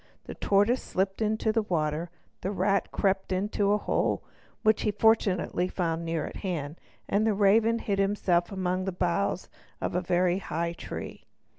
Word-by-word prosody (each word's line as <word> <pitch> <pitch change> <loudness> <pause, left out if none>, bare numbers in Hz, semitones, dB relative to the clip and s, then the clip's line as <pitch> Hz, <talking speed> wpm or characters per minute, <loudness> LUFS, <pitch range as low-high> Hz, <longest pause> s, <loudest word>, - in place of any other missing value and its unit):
The - - -7
tortoise 205 +6 +2
slipped 195 +2 -2
into 220 +1 +1
the 225 +1 +2
water, 165 -3 -1 0.3
the 190 - -2
rat 195 0 +1
crept 195 -1 0
into 200 +2 +1
a 210 - +4
hole, - - 0 0.4
which 215 -1 +4
he - - +1
fortunately 205 -4 +2
found 170 -3 -2
near 165 -2 -2
at - - -7
hand, 165 -5 -4 0.3
and 200 +2 +2
the 220 -2 +2
raven 215 +3 +4
hid 200 -4 -2
himself 195 -3 +1
among 185 -1 -1
the 190 - -1
boughs 180 +1 -1 0.3
of - - -2
a 180 - +1
very 175 +1 +2
high 170 -2 -2
tree. - - -8
195 Hz, 165 wpm, -28 LUFS, 175-205 Hz, 0.4 s, a